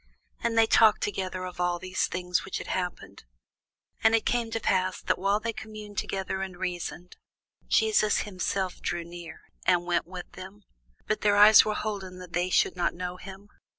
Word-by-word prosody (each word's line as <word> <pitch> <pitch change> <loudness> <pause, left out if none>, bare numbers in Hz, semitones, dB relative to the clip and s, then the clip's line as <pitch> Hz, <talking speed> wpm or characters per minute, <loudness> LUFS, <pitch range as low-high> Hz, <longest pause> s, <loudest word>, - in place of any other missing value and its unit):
And 230 -1 -1
they 225 - +7
talked 220 -1 +5
together 185 -2 -3
of 180 -1 -8
all 175 0 +1
these 185 +1 -1
things 180 -1 -1
which 195 - -4
had - - -6
happened. 180 -1 -4 0.8
And 220 0 +6
it 225 - 0
came 240 -2 0
to 225 0 -2
pass, 185 -3 0
that, - - -1
while 200 +2 +2
they 230 +1 -3
communed 215 -2 -7
together 190 0 -3
and 190 -2 -5
reasoned, 180 -1 -5 0.5
Jesus 430 - +3
himself 190 -1 -3
drew 175 -1 -2
near, 170 -1 -10 0.3
and 175 -1 +3
went 175 -1 0
with 180 -1 -8
them. 190 +3 -11 0.4
But 215 - -1
their 205 -1 +3
eyes 210 +1 +9
were 215 -1 -1
holden 195 -4 -4
that 180 -1 -11
they 175 +1 0
should 185 - +2
not 175 -1 0
know 180 0 -5
him. 195 +2 -11
190 Hz, 185 wpm, -27 LUFS, 180-210 Hz, 0.8 s, eyes